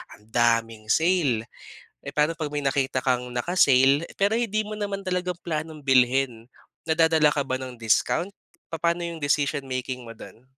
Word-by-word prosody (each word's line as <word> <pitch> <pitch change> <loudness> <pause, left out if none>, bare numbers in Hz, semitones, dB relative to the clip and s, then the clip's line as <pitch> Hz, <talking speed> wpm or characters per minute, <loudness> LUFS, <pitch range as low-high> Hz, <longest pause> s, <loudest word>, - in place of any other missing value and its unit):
ang 105 - -23
daming 115 -2 +1
sale. 160 -10 +2 0.6
Eh 140 - -6
pano 150 +3 +2
pag 155 -3 -3
may 145 -1 -3
nakita 135 -1 0
kang, 125 -1 0
naka 170 +10 -3
sale 135 +1 +5
pero 200 +2 +2
hindi 215 -2 0
mo 210 - -7
naman 200 -1 -3
talaga 180 -1 -1
planong 155 -2 -4
bilhin? 125 -2 +2 0.4
Nadadala 160 -2 +4
ka 145 - -1
ba 130 -1 -2
ng 130 -2 -7
discount? 170 - +1 0.4
Papaano 170 +1 0
'yung 170 -2 -6
decision 145 -1 0
making 130 -1 -4
mo 115 - -10
dun? 125 +4 -14
145 Hz, 165 wpm, -25 LUFS, 125-170 Hz, 0.6 s, sale